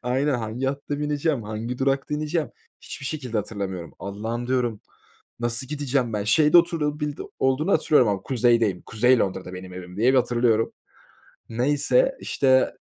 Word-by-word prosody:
Aynen, 130 +4 +1
hangi 120 +2 -3
hatta 140 +1 -3
bineceğim, 150 -2 -1
hangi 110 +4 -5
durakta 135 +2 0
ineceğim 155 +1 -2 0.3
hiçbir 140 - -8
şekilde 130 -7 -4
hatırlamıyorum. 100 -4 -4
"Allah'ım," 110 +5 -4
diyorum, 120 -4 0 0.6
"nasıl 120 +2 -1
gideceğim 140 -5 -1
ben, 105 -1 -2
şeyde 150 +9 +5
oturabildi 150 -3 -1 0.2
olduğunu 135 +8 +1
hatırlıyorum 130 -7 +4
ama 100 -2 -1
Kuzey'deyim, 115 -6 +2
Kuzey 120 +3 +3
Londra'da 95 -2 -2
benim 90 0 -9
evim," 90 0 -9
diye 120 +5 +3
bir - - +3
hatırlıyorum. 120 -2 +1 0.8
Neyse, 145 - +2
işte, 130 -1 +2
125 Hz, 140 wpm, -24 LUFS, 110-145 Hz, 0.8 s, şeyde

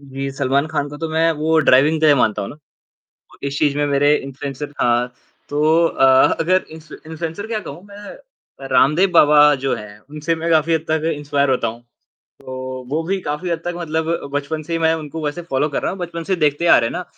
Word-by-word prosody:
जी, 135 0 -6
सलमान 140 +2 0
खान 150 -2 -2
को 145 - -9
तो 165 - -3
मैं 160 +1 +2
वो 160 +1 +2
ड्राइविंग 150 +3 +4
के 155 - +4
दै 145 - +6
मानता 110 -6 +1
हूँ 100 - -5
ना, - - -10 0.8
वो - - -19
इस 140 0 -3
चीज़ 145 -2 +1
में 145 - +1
मेरे 145 +1 +3
इन्फ्लुएंसर 140 +1 -6
हाँ। 120 +1 +1 0.4
तो 155 +3 +2
अ, 135 - +2 0.3
अगर 185 +3 +2
इन्फ्लु 160 0 -12
इन्फ्लुएंसर 165 +5 -5
क्या 220 -1 -3
कहूँ 180 - -10
मैं, 205 0 -11 0.5
रामदेव 155 +8 +3
बाबा 150 -2 +6
जो 135 - +1
है 105 0 -10
उनसे 155 +2 -2
मैं 165 +1 -3
काफ़ी 160 0 +3
हद 160 0 -1
तक 160 +1 0
इंस्पायर 145 -1 0
होता 130 - 0
हूँ। 115 +2 -8 0.4
तो, 130 0 -9
वो 155 +4 -1
भी 190 +3 -2
काफ़ी 160 +2 -4
हद 170 - -1
तक 175 0 -3
मतलब 160 -1 -3
बचपन 145 +2 -3
से 165 +3 -8
ही 165 - 0
मैं 160 0 +2
उनको 160 0 -6
वैसे 150 +4 -3
फॉलो 150 -2 -1
कर 140 - -3
रहा - - -1
हूँ, 195 - -7
बचपन 170 -2 -5
से 190 +1 -1
देखते 150 0 +1
आ - - +7
रहे 115 - +1
हैं - - -7
ना, 180 +1 -4
150 Hz, 225 wpm, -19 LUFS, 140-165 Hz, 0.8 s, आ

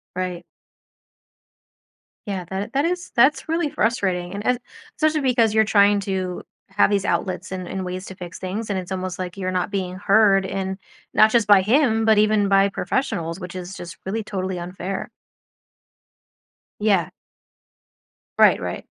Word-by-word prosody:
Right. 180 -1 -4 1.8
Yeah. 190 -3 -3
That 195 +6 -4
that 280 +3 +2
is 360 +1 -2
that's 270 +6 +3
really 330 -2 0
frustrating, 190 -8 -1
and 205 +1 -6
and 250 -1 +2 0.4
especially 310 -1 +2
because 240 -5 +2
you're 220 0 +5
trying 205 -1 +4
to 185 -2 -3 0.3
have 195 +2 +3
these 200 -1 +1
outlets 185 -1 -2
and 185 -2 -5
and 190 - -4
ways 185 +1 -5
to 190 - -9
fix 180 0 -8
things, 205 +4 -4
and 200 - -1
it's 185 0 -6
almost 185 -1 -3
like 180 +1 -5
you're 185 -1 -2
not 185 +2 -1
being 185 -2 -3
heard 195 0 +4
in 190 0 -3 0.4
not 215 0 +5
just 230 -3 +3
by 205 -2 +7
him, 225 +1 +2
but 220 -1 +5
even 210 -1 +3
by 195 0 +4
professionals, 175 -4 -2
which 180 -1 -8
is 185 +1 -7
just 175 -1 -9
really 215 +3 -2
totally 185 -3 -4
unfair. 185 +2 -5 1.7
Yeah. 200 -6 +2 1.3
Right, - - +6
right. - - -5
195 Hz, 160 wpm, -22 LUFS, 185-220 Hz, 1.8 s, by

